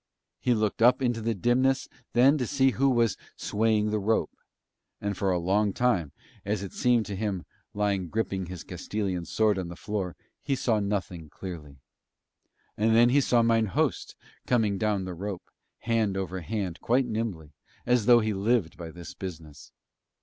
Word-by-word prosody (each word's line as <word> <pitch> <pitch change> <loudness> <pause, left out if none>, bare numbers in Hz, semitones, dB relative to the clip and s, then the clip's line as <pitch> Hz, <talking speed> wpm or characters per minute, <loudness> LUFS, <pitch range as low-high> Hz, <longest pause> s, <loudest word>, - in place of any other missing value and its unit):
He 125 - +2
looked 110 0 -1
up 125 +2 +6
into 120 -2 0
the 115 0 -1
dimness 130 +6 +2 0.3
then 130 +4 +6
to 125 - -1
see 135 -2 +3
who 135 +2 +2
was 115 -4 +2 0.2
swaying 105 0 +1
the 105 - 0
rope; 110 +3 +1 0.7
and 100 0 -2
for 95 +1 0
a 90 - +2
long 100 +4 +1
time, 95 - +1 0.3
as 100 0 -2
it 95 - -7
seemed 120 -3 +2
to 100 - -5
him 100 -3 -3 0.3
lying 100 -4 0
gripping 95 -4 -2
his 90 -1 -7
Castilian 95 -5 -3
sword 105 +3 +1
on 90 - -4
the 85 - -8
floor 95 -2 -4 0.3
he 140 - -1
saw 115 -4 +1
nothing 95 -6 -3
clearly. 80 -7 -8 1.0
And 110 +1 +2
then 120 +1 +6
he 140 +3 +4
saw 120 -3 +3
mine 115 -1 +3
host 95 - -1 0.3
coming 110 -5 +2
down 105 -3 0
the 90 - -5
rope, 95 +1 -6 0.3
hand 110 -4 0
over 95 -1 -3
hand 95 -1 -3
quite 125 +3 +2
nimbly, 110 -10 -4 0.3
as 120 -3 +2
though 120 -1 +7
he 110 0 0
lived 100 -3 0
by 85 -1 -7
this 85 +2 -10
business. 80 -6 -9
105 Hz, 170 wpm, -27 LUFS, 95-115 Hz, 1.0 s, though